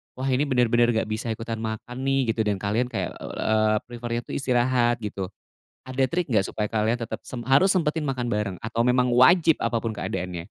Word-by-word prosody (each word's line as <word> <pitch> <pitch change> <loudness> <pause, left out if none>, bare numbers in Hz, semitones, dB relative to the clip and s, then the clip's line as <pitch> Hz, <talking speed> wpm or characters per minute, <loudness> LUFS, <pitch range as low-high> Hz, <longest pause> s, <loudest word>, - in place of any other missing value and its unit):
“Wah 130 +1 -3
ini 140 +4 +1
bener 125 -3 +2
bener 120 -1 +3
nggak 110 -1 -1
bisa 110 +2 -3
ikutan 115 0 -5
makan 120 +4 -5
nih,” 135 -4 +2
gitu 110 -1 -1
dan 105 - +1
kalian 105 +6 -1
kayak, 120 - -3
eee, 110 0 +1
prefer-nya 120 0 -4
itu - - -10
istirahat 120 -2 +2
gitu. 100 -2 -4 0.6
Ada 130 +1 0
trik 170 +4 -2
nggak 100 -3 +3
supaya 105 -1 -3
kalian 110 +1 +1
tetep 115 - -5
sem 125 - -6
harus 135 +9 +4
sempetin 160 -3 0
makan 125 -3 -2
bareng 105 -3 -1
atau 115 +1 0
memang 125 0 +3
wajib 160 +6 +5
apa 115 -1 0
pun 115 - -1
keadaannya? 90 -4 -4
120 Hz, 200 wpm, -25 LUFS, 110-130 Hz, 0.6 s, wajib